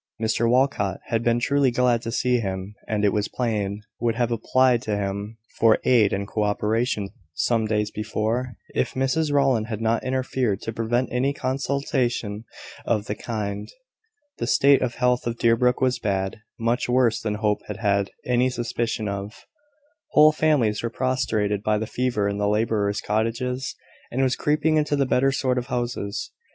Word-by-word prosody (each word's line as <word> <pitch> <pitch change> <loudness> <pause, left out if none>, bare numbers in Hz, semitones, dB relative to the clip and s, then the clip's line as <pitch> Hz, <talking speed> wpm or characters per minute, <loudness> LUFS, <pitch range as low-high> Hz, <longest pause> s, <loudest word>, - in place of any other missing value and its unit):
Mr 115 +1 +1
Walcot 125 -7 +1
had 115 0 0
been 120 0 +2
truly 140 +2 +2
glad 120 -1 +2
to 115 - -4
see 125 0 +1
him, 95 -1 -4
and, 105 -1 0
it 100 - +3
was 105 -1 0
plain, 105 -4 -2 0.2
would 115 -1 0
have 120 0 0
applied 125 +1 +2
to 110 -5 -2
him 100 +2 -4 0.2
for 115 -1 +5
aid 115 -5 +4
and 100 0 -2
co 110 - -2
operation 105 0 0 0.3
some 115 +2 +1
days 105 -1 0
before, 110 +4 -2 0.2
if - - -1
Mrs 140 +4 +1
Rowland 135 -6 +2
had 110 -2 -4
not 115 0 0
interfered, 130 -5 -1
to 115 - -4
prevent 120 +3 0
any 130 +3 +1
consultation 130 -5 -1 0.4
of 105 -3 0
the 105 - -2
kind. 105 -2 -4 0.7
The - - -2
state 140 0 +5
of 120 -2 -1
health 125 -1 +1
of 120 0 -2
Deerbrook 120 +2 +2
was 130 -1 +2
bad, 95 -3 -1 0.2
much 115 +2 0
worse 125 -2 +3
than 105 -1 -2
Hope 105 -1 0
had 105 - -5
had 100 -3 +1 0.2
any 125 +1 +2
suspicion 120 -3 -2
of. 100 +2 -6 0.7
Whole 155 +1 +7
families 145 -9 +2
were 115 - -2
prostrated 110 -6 0
by 105 0 +1
the 110 - -2
fever 120 -3 -1
in 100 0 -2
the 105 0 +1
labourers' 105 -1 0
cottages, 120 +4 -1 0.3
and 125 - -4
it - - +3
was 130 -1 +2
creeping 155 +1 +1
into 150 -1 +1
the 140 -1 +2
better 130 +1 +2
sort 130 -2 0
of 120 - -6
houses. 120 -4 -3
115 Hz, 175 wpm, -24 LUFS, 105-125 Hz, 0.7 s, Whole